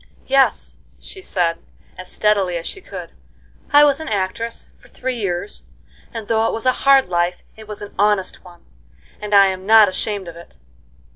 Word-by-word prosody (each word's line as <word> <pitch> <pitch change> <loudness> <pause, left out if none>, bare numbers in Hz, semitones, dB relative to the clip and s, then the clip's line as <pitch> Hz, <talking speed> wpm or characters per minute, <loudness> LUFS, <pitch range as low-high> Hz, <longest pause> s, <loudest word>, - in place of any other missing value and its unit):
"Yes," 270 0 +1 0.2
she 380 - -11
said, 170 - -1 0.4
as 185 0 -10
steadily 200 -4 +1
as 165 - -7
she 385 - -7
could, - - -9 0.6
"I 290 0 +7
was 290 0 +3
an 315 - -6
actress 215 +3 -3
for - - -20
three 255 -1 -4
years, 175 - -4 0.5
and 225 -2 -7
though 225 0 +1
it - - -2
was 225 - -5
a 255 - +5 0.2
hard 270 -1 +7
life 175 0 -1
it 220 -1 -13
was 210 -1 -6
an 205 - -10
honest 205 -2 +2
one, 175 -1 -17 0.5
and 210 -1 -1
I'm 190 -1 +3
not 220 -2 +7
ashamed 200 0 -4
of 170 - -9
it. 170 0 -14
205 Hz, 180 wpm, -19 LUFS, 185-230 Hz, 0.6 s, I